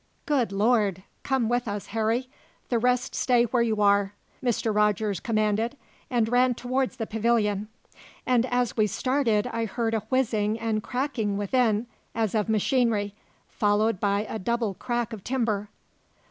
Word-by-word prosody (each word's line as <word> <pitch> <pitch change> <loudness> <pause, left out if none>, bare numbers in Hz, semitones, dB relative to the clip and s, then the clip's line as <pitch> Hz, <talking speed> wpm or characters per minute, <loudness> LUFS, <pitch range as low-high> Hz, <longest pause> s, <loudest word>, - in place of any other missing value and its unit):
"Good 270 -8 +1
Lord! 205 -3 +2 0.2
Come 265 -4 0
with 245 +1 0
us, 205 -1 -3
Harry 225 +3 0 0.4
the 240 - +2
rest 250 +1 +1
stay 245 -2 +3
where 240 +1 +1
you 220 -2 +1
are," 200 0 +3 0.3
Mr. 235 -2 0
Rogers 210 -2 +1
commanded, 220 +4 0 0.3
and 235 -3 +1
ran 245 +1 +3
towards 255 +2 -1
the 230 -3 -3
pavilion; 215 -2 0 0.6
and 250 -1 +2
as 245 -1 0
we 215 -2 +3
started 235 -2 +1
I 230 -2 -2
heard 225 +1 -2
a 225 - +2
whizzing 220 -4 +1
and 225 -1 -1
cracking 245 -5 -2
within, 220 +1 +1 0.3
as 220 -3 0
of 215 -1 0
machinery, 220 -2 +1 0.3
followed 210 0 +1
by 200 +1 +1
a 220 - -4
double 230 +1 -1
crack 240 +2 -3
of 205 -4 -8
timber. 220 -5 -1
225 Hz, 150 wpm, -26 LUFS, 210-245 Hz, 0.6 s, stay